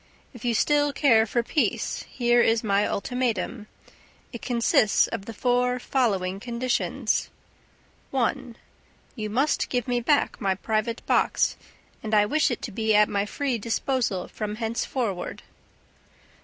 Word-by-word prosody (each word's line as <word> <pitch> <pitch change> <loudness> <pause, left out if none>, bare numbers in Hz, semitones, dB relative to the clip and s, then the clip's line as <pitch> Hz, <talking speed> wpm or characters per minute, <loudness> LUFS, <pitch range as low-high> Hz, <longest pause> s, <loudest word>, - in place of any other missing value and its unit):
If 245 - -12
you 240 -2 +1
still 290 +4 +2
care 230 -6 +4
for 235 +2 0
peace, 295 - -1
here 240 -1 +3
is 225 0 +2
my 205 -1 +2
ultimatum. 230 -2 -2 0.7
It 235 - -7
consists 235 -4 +3
of 220 -4 -5
the 230 - -6
four 250 +2 +1
following 200 -8 0
conditions: 240 +2 -1 0.8
1. 260 -1 -1 0.6
You 215 -4 -4
must 270 +8 +1
give 245 -3 -1
me 245 -1 +1
back 285 +5 +1
my 190 -1 +1
private 220 +3 -2
box; - - +2 0.5
and 215 -1 -1
I 210 0 +5
wish 300 +8 +2
it 245 - -4
to 230 - -4
be 220 +1 +1
at 210 0 +5
my 200 0 -1
free 265 0 -2
disposal 230 -3 -1
from 210 -1 -5
henceforward. 225 -3 -3
235 Hz, 140 wpm, -25 LUFS, 210-250 Hz, 0.8 s, I